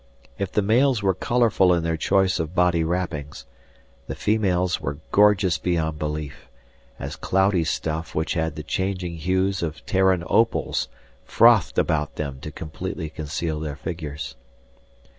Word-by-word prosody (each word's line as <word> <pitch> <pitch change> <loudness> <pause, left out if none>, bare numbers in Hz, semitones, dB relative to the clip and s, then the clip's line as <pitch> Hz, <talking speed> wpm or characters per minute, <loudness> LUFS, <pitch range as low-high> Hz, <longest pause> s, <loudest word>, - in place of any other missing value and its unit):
If 100 -2 -2
the 105 - +1
males 120 +2 +3
were 95 -1 +3
colorful 105 -2 +2
in 85 - -1
their 85 0 0
choice 95 +3 +2
of 80 +2 -3
body 90 -2 +3
wrappings, 80 -4 -3 0.6
the - - -4
females 95 -4 +1
were 70 +1 -3
gorgeous 100 -4 +4
beyond 80 -3 -1
belief, 75 -2 -5 0.5
as - - -6
cloudy 95 -2 +2
stuff 80 0 -3
which 80 +3 0
had 80 -3 -1
the 75 - -6
changing 90 -2 -2
hues 95 +3 0
of 80 -2 -4
Terran 95 -2 +2
opals 115 +7 +1 0.4
frothed - - +4
about 75 -3 0
them 70 -3 -4
to 75 - -7
completely 80 +2 -6
conceal 80 +1 -3
their 75 -2 -4
figures. 75 -1 -6
85 Hz, 140 wpm, -24 LUFS, 80-95 Hz, 0.6 s, gorgeous